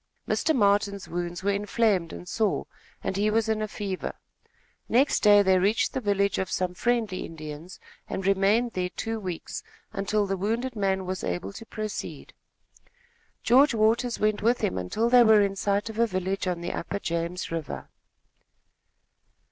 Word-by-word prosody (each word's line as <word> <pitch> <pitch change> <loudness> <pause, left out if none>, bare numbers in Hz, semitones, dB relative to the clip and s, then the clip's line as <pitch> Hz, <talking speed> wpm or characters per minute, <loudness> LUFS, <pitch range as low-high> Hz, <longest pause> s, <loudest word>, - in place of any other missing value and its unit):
Mr. 315 - +1
Martin's 200 -3 +2
wounds 175 +1 -4
were 200 - +2
inflamed 200 -3 +1
and 180 - -9
sore, 215 0 0 0.4
and 190 - -2
he 210 +1 +2
was 220 +1 +1
in 220 -1 0
a 215 - -1
fever. 200 -3 -4 0.7
Next 265 +5 +3
day 205 -1 +7
they 190 -1 +4
reached 205 +5 +1
the 260 - -2
village 200 -2 +1
of 190 - -2
some 185 -1 -1
friendly 225 -2 0
Indians, 155 +2 -8 0.3
and 190 - -3
remained 200 +5 +3
there 180 -1 -1
two 225 +4 -4
weeks, 180 -5 -5 0.3
until 205 +1 0
the 195 0 -2
wounded 230 +6 -2
man 190 -2 0
was 185 0 -4
able 90 +2 -3
to 225 - -10
proceed. 215 -1 -6 1.1
George 265 +2 +5
Waters 230 +3 +2
went 215 0 +1
with 235 +3 +2
him - - 0
until 95 - -1
they 245 +1 +7
were 220 -2 +6
in 195 -1 -1
sight 200 +2 0
of 220 0 -6
a 235 - +4
village 190 0 -2
on 175 -2 -2
the 170 - -3
upper 200 - -3
James 170 -1 -3
River. 165 -3 -5
200 Hz, 165 wpm, -27 LUFS, 185-220 Hz, 1.1 s, day